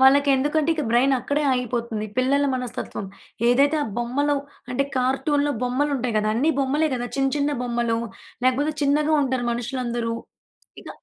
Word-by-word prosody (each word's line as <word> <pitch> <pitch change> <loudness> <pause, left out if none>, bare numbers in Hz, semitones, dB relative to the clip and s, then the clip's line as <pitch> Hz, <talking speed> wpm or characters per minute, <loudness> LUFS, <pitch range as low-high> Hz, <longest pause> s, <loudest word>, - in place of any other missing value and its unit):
వాళ్ళకేందుకంటే 280 +3 +4
ఇక 310 - -2
బ్రైన్ 250 +4 +4
అక్కడే 285 +4 -1
ఆగిపోతుంది 235 -3 -2
పిల్లల 270 +3 +2
మనస్తత్వం. 250 -5 -4 0.4
ఏదైతే 280 +5 +4
ఆ - - -2
బొమ్మలు 275 +5 0 0.4
అంటే, 250 +2 +1
కార్టూన్‌లో 285 +3 +1
బొమ్మలు 255 +4 0
ఉంటాయి 245 -3 -2
కదా 215 0 +1
అన్ని 285 +8 +2
బొమ్మలే 285 +4 +1
కదా 245 -1 -3
చిన్న 270 0 +2
చిన్న 290 0 +1
బొమ్మలు. 235 -1 0 0.5
లేకపోతే 270 +4 +2
చిన్నగా 295 +2 +2
ఉంటారు 260 -2 -1
మనుషులందరు. 240 -1 -2 0.7
ఇగ - - -12
260 Hz, 140 wpm, -23 LUFS, 245-285 Hz, 0.7 s, వాళ్ళకేందుకంటే